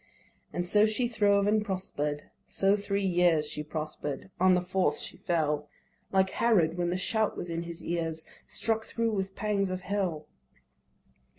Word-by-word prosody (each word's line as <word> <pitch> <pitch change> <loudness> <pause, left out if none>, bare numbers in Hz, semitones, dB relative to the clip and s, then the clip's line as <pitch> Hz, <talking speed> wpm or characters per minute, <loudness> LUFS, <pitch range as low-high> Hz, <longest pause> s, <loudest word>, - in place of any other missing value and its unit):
And 175 - -2
so 210 +3 +5
she 230 +3 +1
throve 205 -3 +3
and 210 +1 +3
prosper'd: 150 -7 -3 0.2
so 195 +1 +3
three 200 -1 -1
years 175 -4 +3
She 150 - -3
prosper'd; 155 +1 -5
on 185 0 +5
the 180 - +2
fourth 180 -4 +1
she - - -3
fell, 150 -3 0 0.4
Like 190 -1 +3
Herod, 180 -9 +3
when 175 -1 0
the 180 - 0
shout 215 +3 0
was 175 - -4
in 165 0 -2
his 170 -1 -7
ears, 165 -2 -2 0.2
Struck 225 0 -1
thro' 230 -1 -1
with 195 -2 -2
pangs 205 -2 0
of 185 0 -3
hell. 185 -6 -2
185 Hz, 165 wpm, -29 LUFS, 165-205 Hz, 0.4 s, so